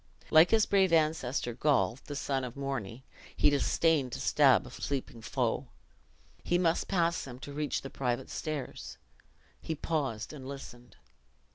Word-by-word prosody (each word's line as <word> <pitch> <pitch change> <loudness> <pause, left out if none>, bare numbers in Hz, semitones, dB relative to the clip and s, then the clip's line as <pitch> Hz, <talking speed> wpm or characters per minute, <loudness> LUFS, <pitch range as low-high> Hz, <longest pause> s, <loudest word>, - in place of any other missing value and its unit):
Like 160 +2 +7
his 225 -2 +4
brave 190 -3 +3
ancestor, 155 -6 +1
Gaul, 135 -1 +1
the 145 - -6
son 135 -2 -1
of 125 -1 -6
Morni, 135 -4 -4 0.3
"he 145 - +5
disdained 145 -1 +2
to - - -4
stab - - +4
a - - -10
sleeping 130 -4 -4
foe!" - - -1 0.8
He 175 - +2
must 170 -2 +1
pass 170 -3 +1
them 125 -2 -8
to 140 +2 -9
reach 150 0 -2
the 135 - -7
private 125 -1 -2
stairs. 150 -5 -5 0.6
He 160 - -3
paused 140 -7 -2
and 135 -3 -9
listened. 125 -3 -10
140 Hz, 150 wpm, -30 LUFS, 130-160 Hz, 0.8 s, Like